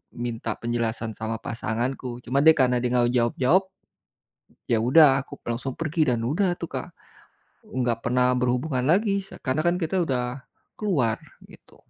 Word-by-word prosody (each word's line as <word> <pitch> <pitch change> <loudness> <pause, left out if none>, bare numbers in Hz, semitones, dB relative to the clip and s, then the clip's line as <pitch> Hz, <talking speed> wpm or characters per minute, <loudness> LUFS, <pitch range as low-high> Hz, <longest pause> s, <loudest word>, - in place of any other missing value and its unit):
minta 120 -1 -3
penjelasan 115 -1 -2
sama 110 0 -3
pasanganku 120 +2 -3
cuma 130 +3 +1
dia 160 0 +8
karena 125 -2 +3
dia 125 - 0
gak 120 -1 +4
mau - - 0
jawab-jawab 125 +8 +2 1.1
ya 115 - +3
udah 135 0 +6
aku - - -12
langsung 120 +3 -3
pergi 155 -2 0
dan 120 - -1
udah 165 - +1
tuh 170 - -4
Kak, - - -5 0.8
enggak 120 -3 -1
pernah 125 +1 +2
berhubungan 125 +2 0
lagi 200 +3 +2 0.2
karena 130 +3 0
kan 175 +2 +2
kita 180 +1 -1
udah, 125 -4 -2 0.4
keluar 140 - +1 0.3
gitu. - - -18
125 Hz, 150 wpm, -25 LUFS, 120-155 Hz, 1.1 s, dia